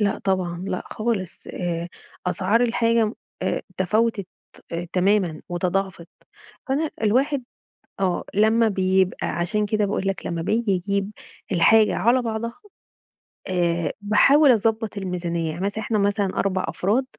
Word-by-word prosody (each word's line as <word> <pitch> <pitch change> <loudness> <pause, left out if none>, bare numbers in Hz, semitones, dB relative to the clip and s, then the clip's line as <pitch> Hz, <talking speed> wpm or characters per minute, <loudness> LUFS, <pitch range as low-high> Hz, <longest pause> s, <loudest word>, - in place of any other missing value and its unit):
لأ 200 -1 +1
طبعًا، 185 -2 -1
لأ 185 - -2
خالص، 215 -5 -3
آآ، 170 -1 -3 0.4
أسعار 195 +5 +2
الحاجة 230 -2 +2 0.3
آآ، - - -1
تفاوتت 210 +1 +1 0.7
تمامًا 185 -3 +2
وتضاعفت، 180 0 -2 0.6
أنا 300 +3 +1
الواحد 260 +5 +2 0.6
آه 185 -2 0
لمّا 220 +3 +4
بيبقى 190 -2 +1
عشان 190 +5 -1
كده 210 0 +1
باقول 195 -1 -2
لك 195 - -2
لمّا 170 -1 -2
بيجي 215 +4 0
يجيب 200 +2 -1 0.4
الحاجة 215 +5 +5
على 240 +6 +3
بعضها 230 0 -3 0.9
آآ، 170 -3 0
باحاول 270 +8 +5
أضبّط 225 -1 0
الميزانية 175 -4 -2
يعني 170 +4 -7
مثلًا 205 +2 -2
إحنا 215 -1 0
مثلًا 200 0 +1
4 185 -1 0
أفراد، 225 +8 0
200 Hz, 125 wpm, -23 LUFS, 180-225 Hz, 0.9 s, الحاجة